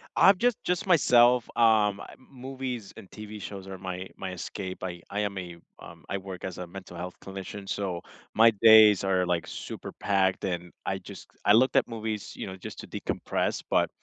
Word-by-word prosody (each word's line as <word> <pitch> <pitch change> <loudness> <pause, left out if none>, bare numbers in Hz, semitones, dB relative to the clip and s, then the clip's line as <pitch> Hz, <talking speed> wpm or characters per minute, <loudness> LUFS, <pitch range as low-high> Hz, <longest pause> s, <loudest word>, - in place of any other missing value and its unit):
I've 195 0 +6
just 245 +2 +2
just 180 +2 -1
myself, 125 - +5
um, 105 -3 +4
I - - -10
m 130 - -20
movies 130 -4 -6
and 95 - -12
TV 105 0 -9
shows 95 -1 -7
are 95 -1 -8
my 95 0 -5
my 95 -1 -5
escape, 95 +1 -6
I 90 -2 -5
I 105 +1 -2
am 100 -1 -2
a 85 -2 -8 0.2
um, 85 -3 -13
I 100 - -2
work 95 -1 -8
as 90 -2 -5
a 90 - -5
mental 95 0 -10
health 90 +1 -6
clinician, 95 +1 -8
so 95 -4 -3 0.3
my 115 +1 +7
days 110 -3 +8
are, 95 -1 +2
like, 90 -1 0
super - - -7
packed, 95 -1 0
and, 90 -2 -3
I - - -1
just - - -11 0.2
I 105 - +6
look 130 +3 +4
at - - +4
movies, 110 -2 -5
you - - -5
know, 95 - -6
just 95 - -9
to - - -11
decompress, - - -2
but, - - +2
100 Hz, 200 wpm, -28 LUFS, 95-115 Hz, 0.3 s, days